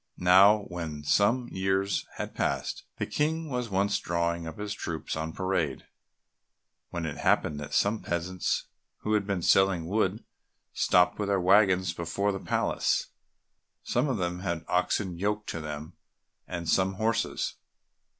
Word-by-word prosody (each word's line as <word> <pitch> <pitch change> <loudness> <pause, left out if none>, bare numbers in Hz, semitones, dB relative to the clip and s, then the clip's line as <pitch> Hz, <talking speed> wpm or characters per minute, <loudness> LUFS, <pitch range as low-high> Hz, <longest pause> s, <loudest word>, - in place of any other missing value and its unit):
Now 100 +4 +6
when 80 -5 -6
some 115 - +2
years 95 +1 0
had - - -5
passed, - - -2
the - - -1
King 160 +1 -1
was 125 -2 -2
once 100 +1 +1
drawing 85 -1 -1
up 80 - -7
his 105 0 -4
troops 85 -5 -4
on 80 0 -3
parade, 85 -7 -1 1.0
when 85 -2 -4
it 75 -2 -4
happened 75 - +1
that 75 - -5
some 105 +2 +2
peasants 90 +1 -2 0.4
who 105 - -1
had 105 -2 +1
been 95 -4 -1
selling 95 -3 +4
wood 100 +2 0 0.5
stopped 90 +3 +3
with 100 -1 -1
their 100 -1 +2
waggons 95 -2 +4
before 85 +5 -1
the 95 - -4
palace; - - 0 0.7
some 150 - 0
of 130 - 0
them 90 -1 -2
had 85 -3 -3
oxen 90 0 0
yoked 105 +2 -1
to 85 - -4
them, 75 +2 -6 0.5
and 85 -2 -5
some 95 +3 +2
horses. 110 +2 -1
95 Hz, 150 wpm, -28 LUFS, 85-100 Hz, 1.0 s, Now